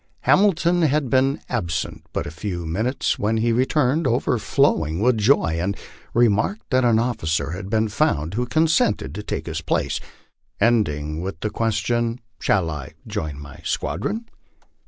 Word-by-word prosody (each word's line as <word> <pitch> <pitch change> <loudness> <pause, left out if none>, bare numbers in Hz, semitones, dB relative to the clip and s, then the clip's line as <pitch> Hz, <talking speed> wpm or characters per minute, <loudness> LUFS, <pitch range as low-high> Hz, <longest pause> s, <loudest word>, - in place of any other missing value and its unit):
Hamilton 175 -3 +3
had 150 -4 +1
been 135 +1 +3
absent 85 -7 -3
but - - -2
a - - -6
few 85 +1 -4
minutes 110 +11 -1
when 110 +2 +1
he 115 +1 +2
returned 130 +5 +2
overflowing 115 - +1
with 115 +1 +3
joy, 100 - +3
and 100 +4 -1 0.4
remarked 120 - +2
that 130 0 +3
an 120 -2 +4
officer 110 -10 0
had 95 +2 -6
been 110 +1 +2
found 95 - 0
who 125 +3 -1
consented 120 - +2
to 105 - -5
take 105 - -4
his 85 0 -4
place, - - -1 0.6
end 115 -5 +4
ing 75 +2 -4
with 90 -3 -5
the 105 - -2
question, 115 +2 0
" 115 - -46
Shall 85 -5 +1
I 75 -3 -7
join 75 -2 -4
my 70 -1 -11
squadron? 115 - -2
110 Hz, 155 wpm, -22 LUFS, 85-125 Hz, 0.6 s, an